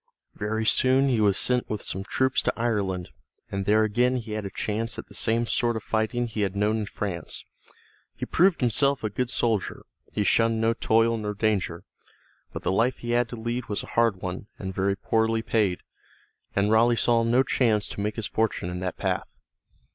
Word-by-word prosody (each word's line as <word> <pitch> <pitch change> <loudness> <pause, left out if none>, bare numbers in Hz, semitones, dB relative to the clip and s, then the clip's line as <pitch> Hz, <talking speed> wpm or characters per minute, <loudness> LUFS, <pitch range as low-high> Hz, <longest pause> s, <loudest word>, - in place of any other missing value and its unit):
Very 110 +2 -2
soon 130 +4 +4
he 120 -4 +2
was 100 -2 +3
sent 125 -1 +2
with 105 -1 -3
some 95 - -3
troops 130 +5 +1
to - - 0
Ireland, 100 -6 -1 0.4
and 100 -1 -3
there 110 +1 +4
again 125 +4 +2
he 115 -3 -5
had 105 -2 -3
a - - -6
chance 110 +4 -3
at - - -6
the - - -16
same 115 +1 +1
sort 120 0 0
of 110 - -4
fighting 110 +2 0
he 110 -2 -4
had 100 -1 -1
known 105 +2 +1
in 105 - -2
France. 95 -6 -3 0.7
He - - -4
proved 180 -1 +3
himself 140 +3 +2
a 110 - -1
good 125 +4 -2
soldier; 115 -5 -1 0.3
he 105 - 0
shunned 115 +3 +2
no 115 +1 +2
toil 115 0 +2
nor 105 -1 -4
danger. 100 -6 -1 0.7
But - - -7
the - - +1
life 115 +6 +1
he 120 - -5
had 120 0 +2
to - - -6
lead 120 +2 -3
was 105 - -2
a - - -10
hard 115 -5 +2
one, 95 +2 -5
and 95 -1 -5
very 100 +1 0
poorly 110 +1 +1
paid, 105 -6 0 0.7
and 100 +2 +2
Raleigh 115 +2 +4
saw 115 0 +3
no 120 +3 +3
chance 110 -7 +1
to - - -5
make 105 +1 -2
his 115 - -3
fortune 110 -6 -1
in 90 - -4
that 90 -1 -4
path. - - -1
110 Hz, 200 wpm, -26 LUFS, 100-120 Hz, 0.7 s, soon